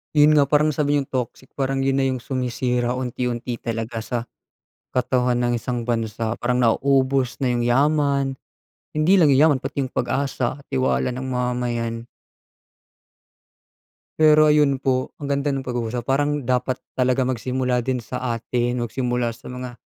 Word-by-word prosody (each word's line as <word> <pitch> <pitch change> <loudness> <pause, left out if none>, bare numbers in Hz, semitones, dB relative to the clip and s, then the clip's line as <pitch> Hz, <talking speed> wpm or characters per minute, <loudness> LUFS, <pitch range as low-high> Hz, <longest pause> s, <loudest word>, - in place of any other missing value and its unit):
Yun 150 0 +6
nga 140 - +4
parang 150 +2 +3
nasabi 145 0 0
ni'yong 140 -2 -1
toxic, 130 0 -4
parang 135 0 0
yun 135 0 +1
na 135 - +2
yung 130 -2 -2
sumisira 125 -1 -1
unti-unti 125 -1 -3
talaga 115 0 -4
sa 120 +2 -3 0.7
katawan 125 -1 +1
ng 120 0 +1
isang 120 0 -3
bansa, 115 -1 -1
parang 125 +1 -1
nauubos 130 +1 +2
na 130 - +1
yung 120 -1 0
yaman. 140 +1 +2 0.6
Hindi 160 +6 +4
lang 150 -6 +5
yaman 145 0 +5
pati 140 +1 -3
yung 130 - -4
pag-asa, 135 +1 -2
tiwala 130 -1 +1
ng 130 +1 -5
mamamayan. 120 -2 -2 2.1
Pero 155 0 +6
ayun 150 -2 +4
po, 130 -1 0
ang 145 - -5
ganda 140 +1 0
ng 135 -1 -3
pag-uusap 120 -1 -3
parang 145 0 0
dapat 125 0 0 0.2
talaga 130 0 +1
magsimula 125 0 -1
din 130 +1 -1
sa 120 0 -3
atin, 120 +1 -1
magsimula 120 0 -1
sa - - -11
mga 125 -1 -6
125 Hz, 150 wpm, -22 LUFS, 120-135 Hz, 2.1 s, Yun